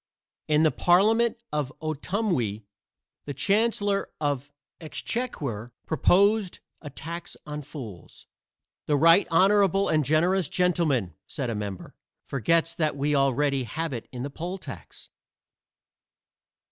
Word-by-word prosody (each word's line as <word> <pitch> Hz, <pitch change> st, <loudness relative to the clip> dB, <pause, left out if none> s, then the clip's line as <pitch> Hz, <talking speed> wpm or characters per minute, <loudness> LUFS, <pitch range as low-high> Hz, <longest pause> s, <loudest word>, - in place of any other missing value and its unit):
In 150 Hz, 0 st, +3 dB
the 155 Hz, -, +4 dB
Parliament 220 Hz, +7 st, +3 dB, 0.2 s
of 145 Hz, -3 st, -1 dB
Otumwee 155 Hz, -, -2 dB, 0.6 s
the 145 Hz, -, -5 dB
Chancellor 205 Hz, -, +1 dB
of 145 Hz, -3 st, -1 dB, 0.3 s
the 165 Hz, -, -10 dB
Exchequer 145 Hz, -, -3 dB, 0.2 s
proposed 195 Hz, +6 st, +3 dB, 0.2 s
a 150 Hz, -, -7 dB
tax 170 Hz, +4 st, -7 dB
on 150 Hz, 0 st, -5 dB
fools. 125 Hz, -, -10 dB, 0.6 s
"The 150 Hz, -, +3 dB
right 165 Hz, +6 st, +6 dB
honorable 195 Hz, +2 st, +4 dB
and 155 Hz, -1 st, +2 dB
generous 165 Hz, +4 st, +2 dB
gentleman," 160 Hz, -, +1 dB
said 130 Hz, -6 st, -3 dB
a -, -, -3 dB
member, 100 Hz, -3 st, -6 dB, 0.3 s
"forgets 165 Hz, +6 st, +1 dB
that 155 Hz, -3 st, -1 dB
we 145 Hz, +2 st, 0 dB
already 135 Hz, -1 st, +2 dB
have 160 Hz, +6 st, -3 dB
it 115 Hz, -2 st, -6 dB
in 125 Hz, -2 st, -5 dB
the 140 Hz, -, -5 dB
poll 175 Hz, +6 st, -5 dB
tax." -, -, -10 dB
155 Hz, 120 wpm, -26 LUFS, 135-180 Hz, 0.6 s, right